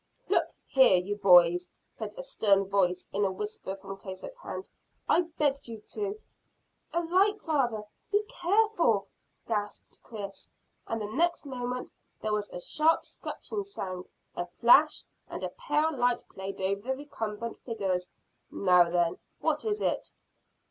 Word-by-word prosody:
"Look 345 -4 +3 0.2
here, 260 -9 +6
you 190 +3 -1
boys," 180 -3 +6 0.2
said - - -7
a - - -5
stern 205 - +3
voice, 185 -2 +1
in 205 - +1
a 195 - +2
whisper 200 0 -5
from 195 0 -8
close 190 -1 -8
at - - -6
hand, - - -7 0.4
"I - - +5 0.2
begged 280 -2 +1
you 225 -2 -7
to 410 0 -3 0.4
" - - -41
"A 340 - +2
light, 385 +5 +3
father! 250 -9 +1 0.3
Be 410 +1 +3
careful!" 350 - +2 0.4
gasped 210 -2 -4
Chris, 200 -4 -8 0.4
and 225 - -2
the 210 - -3
next 330 +11 0
moment 250 -2 -4 0.3
there 215 -1 -1
was 210 -1 -1
a - - -6
sharp 315 - +2
scratching 415 -2 -5
sound, 185 - -6 0.3
a 175 - -3
flash, 260 - +5 0.3
and - - -6
a - - -1
pale 320 -11 0
light 245 -1 +1
played 190 +1 -6
over 195 +1 0
the 265 - +1
recumbent 235 -5 -5
figures. 190 -6 -2 0.4
"Now 180 -3 +4
then, 170 -1 +1 0.2
what - - 0
is 420 -1 0
it?" - - 0
225 Hz, 155 wpm, -29 LUFS, 195-320 Hz, 0.4 s, here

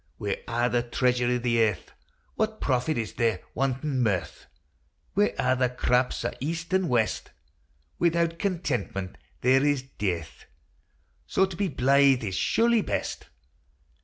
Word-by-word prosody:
Wi' 100 -1 -3
a' 120 +1 +1
the 120 0 +1
treasure 125 0 +1
i' 125 0 +2
the 120 -1 +1
earth 105 -4 -1 0.4
What 220 0 -1
profit 130 +2 0
is 115 -2 -3
there, 115 -2 +1
wantin' 135 +1 -1
mirth? 100 -7 -1 0.7
Wi' 205 +2 +2
a' 130 0 +2
the 125 -1 +1
craps 125 0 0
o' - - -1
east 165 +5 -4
an' 190 -1 +2
west, 120 -6 0 0.7
Without 170 -1 +1
contentment 140 - -2 0.3
there 130 +2 +4
is 145 -3 +1 0.2
dearth: 85 -6 -3 0.8
So 190 - +3
to 190 -2 -7
be 200 +3 0
blythe 135 -2 +4
is 100 -3 -3
surely 235 0 +3
best. - - -3
130 Hz, 140 wpm, -27 LUFS, 120-165 Hz, 0.8 s, there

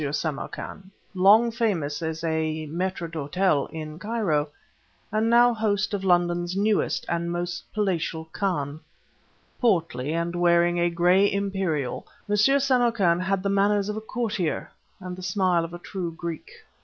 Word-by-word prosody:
Samarkan, 155 +5 -5 0.2
long 205 +5 +5
famous 170 -11 -1
as 160 0 -4
a 160 -1 -1
mâitre 175 +2 -3
d' 165 - -16
hôtel 155 0 0
in 155 -1 -7
Cairo, 195 -10 0 0.6
and 215 +2 +1
now 240 +1 +6
host 210 -3 0
of 200 -1 -2
London's 175 0 +1
newest 210 +1 +1
and 170 0 -1
most 175 0 -4
palatial 170 -6 -1
khan. 155 -7 -2 0.8
Portly, 165 - +1
and 170 +1 -2
wearing 175 0 +3
a 175 0 +3
gray 180 +4 +3
imperial, 190 -9 -2 0.2
M. 210 - +1
Samarkan 240 -7 +3
had 190 +1 -1
the 200 - 0
manners 200 +1 +2
of 210 - -2
a 215 - -4
courtier, 215 -7 -2 0.3
and 185 -1 -6
the 185 - -10
smile 185 -2 +1
of 165 - -6
a 175 - -6
true 175 -1 -5
Greek. 165 -1 -6
180 Hz, 145 wpm, -25 LUFS, 165-205 Hz, 0.8 s, now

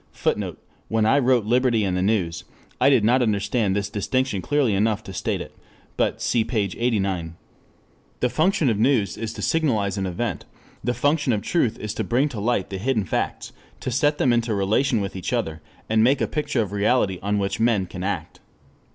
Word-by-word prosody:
[Footnote: - - -1 0.3
When 110 -1 +1
I 135 +6 +4
wrote 125 -4 +3
Liberty 120 -1 +2
and 95 -2 0
the 90 - 0
News, 95 -5 0 0.4
I 130 - +5
did 130 -6 +4
not 125 +4 +4
understand 105 -2 +1
this 100 -1 -1
distinction 105 +1 -1
clearly 145 -4 +1
enough 105 +2 +1
to 95 - -9
state - - -2
it, - - -9 0.4
but - - 0
cf. 115 -2 0
p. 120 - -2 0.2
89 100 -8 0
ff.] 85 - -15 0.8
The 125 - +1
function 160 - +2
of 105 - -1
news 110 -6 +2
is 115 -1 -4
to - - -6
signalize 110 -11 +1
an 95 - -1
event, 95 +3 -3 0.4
the 125 0 0
function 145 +2 +1
of 105 - -2
truth 130 -10 +1
is 105 -1 -4
to - - -2
bring 130 +5 +1
to 120 -7 -6
light 105 -3 0
the 95 - -4
hidden 110 -1 0
facts, - - -3 0.3
to 130 - -3
set 145 +4 +2
them 125 -4 +3
into 115 -2 +1
relation 110 +4 +1
with 100 -1 -4
each 95 - -4
other, 80 0 -2 0.3
and 110 0 +3
make 135 +4 +4
a - - +1
picture 145 -6 -1
of 100 - -7
reality 100 -2 +1
on 100 +1 0
which 100 -1 -1
men 115 -4 +2
can 90 0 -7
act. 95 -5 -4
110 Hz, 205 wpm, -23 LUFS, 100-125 Hz, 0.8 s, I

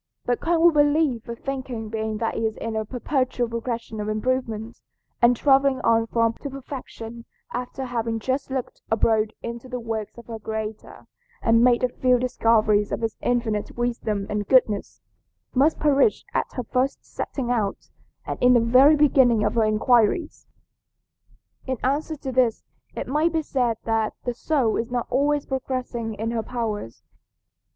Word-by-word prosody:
But 245 -1 0
can 335 0 +1
we 340 0 +7
believe 290 -5 +2
a 235 - -3
thinking 255 -3 -5
being 220 0 -3
that 225 0 -2
is 220 -1 -1
in 230 -1 -4
a 220 - 0
perpetual 255 0 -1
progress 230 0 -4
of 210 -1 -4
improvement, 225 0 -2 0.4
and 240 +1 +6
traveling 275 0 +4
on 225 0 +3
from 230 0 +1
perfection - - -23
to 285 - -5
perfection 245 -4 -8 0.3
after 250 +2 -4
having 230 -2 -2
just 260 +5 -2
looked 265 -2 -4
abroad 220 -1 +2
into 235 +2 -6
the 250 -1 -4
works 225 -2 -5
of 235 - -11
her 225 -1 -7
Creator 220 0 -6 0.4
and 230 0 +4
made 245 0 +4
a - - +5
few 250 0 +2
discoveries 220 -4 +2
of - - -2
his 225 -1 -2
infinite 230 -4 -1
wisdom 230 -4 -1
and 210 -1 -3
goodness, 220 -6 +2 0.5
must 285 +5 +3
perish 295 +7 +3
at - - -1
her 250 - -3
first 255 +3 -1
setting 245 -3 -4
out 215 -5 -2 0.3
and - - -5
in 250 0 +6
the - - +6
very 255 +6 +6
beginning 260 -7 +4
of 210 - +1
her 225 -2 +3
inquiries?" 230 - +2 1.2
In 260 -1 -1
answer 295 +4 0
to 270 -2 -5
this 250 -3 +2 0.3
it - - -4
may 305 +5 +2
be 320 -1 -1
said 245 -6 0
that 225 -1 0
the 245 - -2
soul 250 -3 0
is 230 - -2
not 245 -1 -1
always 290 +2 +1
progressing 255 -4 -3
in 225 +2 -3
her 230 -1 -1
powers. 220 - -4
240 Hz, 165 wpm, -24 LUFS, 225-260 Hz, 1.2 s, we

